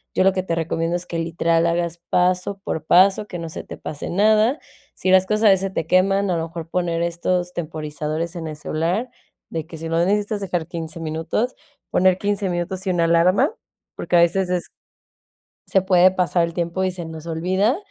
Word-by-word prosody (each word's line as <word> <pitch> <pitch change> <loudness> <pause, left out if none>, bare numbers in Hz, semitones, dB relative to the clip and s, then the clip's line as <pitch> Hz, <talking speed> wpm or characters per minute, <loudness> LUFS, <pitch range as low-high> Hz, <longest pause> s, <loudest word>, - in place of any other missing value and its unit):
yo - - +3
lo 190 0 +4
que 185 - 0
te 170 -3 -2
recomiendo 165 +1 -1
es 175 0 -3
que 170 -2 -4
literal 165 0 +1
hagas 170 0 -1
paso 180 +2 +1
por 160 - -3
paso 195 +5 +4
que 180 - -6
no 165 - -5
se 160 - -7
te - - -9
pase 150 - -6
nada, 215 - +3 0.4
si 185 - 0
las 190 0 +6
cosas 215 +2 0
a 210 - +8
veces 190 - +5
se 195 - -1
te 190 - -3
queman, 195 +2 +3
a - - +1
lo 165 - -2
mejor 165 0 -7
poner 170 -1 -1
estos 175 +1 -1
temporizadores 155 +1 -4
en 165 -2 -5
el 155 - -6
celular 170 +10 -2 0.4
de 160 -2 -3
que 165 - -9
si 165 +1 -6
lo 165 +1 +1
necesitas 205 +2 0
dejar 175 -4 -2
15 165 -1 -6
minutos, 165 +10 -2 0.4
poner 185 0 +4
15 200 -1 -1
minutos 180 +2 -3
y - - +2
una 175 -2 +2
alarma 180 - +3 0.4
porque 175 +1 -1
a - - +7
veces 180 +2 +2
es 180 -1 -2 1.0
se 190 - +3
puede 185 -1 +5
pasar 180 -2 +1
el 170 - -8
tiempo 170 +2 -1
y 185 - +2
se 175 -2 -7
nos 160 0 -8
olvida, 185 - +1
175 Hz, 210 wpm, -22 LUFS, 165-190 Hz, 1.0 s, a